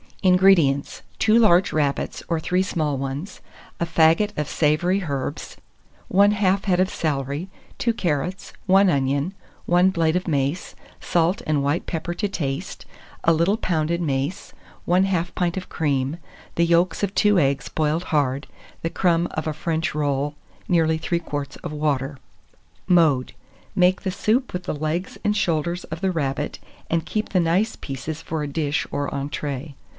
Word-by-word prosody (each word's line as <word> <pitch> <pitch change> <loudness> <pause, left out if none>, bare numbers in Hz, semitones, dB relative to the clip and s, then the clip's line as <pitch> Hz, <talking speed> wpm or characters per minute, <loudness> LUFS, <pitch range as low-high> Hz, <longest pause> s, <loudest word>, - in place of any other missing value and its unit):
181. 185 -1 +5
INGREDIENTS. 170 -8 +3 0.2
2 220 +1 +4
large 190 -5 +4
rabbits, 145 -2 -1
or 165 -2 0
3 180 +3 +1
small 155 -6 -1
ones; 135 +7 -5 0.4
a 170 - +1
faggot 165 +6 +3
of 150 -1 -1
savoury 175 +5 +1
herbs, 140 -2 -4 0.6
1/2 200 +2 +6 0.3
head 180 -3 +2
of 185 0 +3
celery, 145 +3 -2 0.3
2 235 - +1
carrots, 180 -2 -2
1 195 +1 +6
onion, 140 +4 0 0.3
1 180 +2 +4
blade 165 -3 +1
of 180 +1 -1
mace, 145 +2 -1 0.2
salt 175 +3 +1
and 150 -2 +1
white 145 +4 0
pepper 170 0 -3
to 205 +4 -1
taste, 140 -8 -4 0.4
a 165 - +5
little 170 +6 +2
pounded 170 -3 0
mace, 145 +4 -2 0.3
1/2 180 -1 +2
pint 175 0 -1
of 185 - -5
cream, 140 -1 -1 0.4
the 170 - +3
yolks 170 0 +2
of 200 -1 -1
2 210 -3 +4
eggs 140 -2 0
boiled 155 +2 0
hard, 140 -2 0 0.4
the 165 - 0
crumb 170 -1 +2
of 155 - -3
a 155 - -1
French 160 0 -2
roll, 145 -1 -1 0.3
nearly 160 -2 +3
3 170 +1 -1
quarts 145 -4 -5
of - - -7
water. 145 -2 -1 0.7
Mode. 160 -8 +3 0.4
Make 180 0 +3
the 190 - -2
soup 225 +6 0
with 180 0 -3
the - - -3
legs 155 +5 -3
and 210 - +1
shoulders 170 0 0
of 160 +1 -7
the 190 -1 +1
rabbit, 150 -3 -2 0.3
and 165 -1 +1
keep 215 0 -2
the 185 - +2
nice 180 +7 +1
pieces 145 +3 -6
for 160 -2 -3
a - - -2
dish 145 0 -1
or 145 0 -1
entrée. 140 0 -4
165 Hz, 160 wpm, -23 LUFS, 145-180 Hz, 0.7 s, 1/2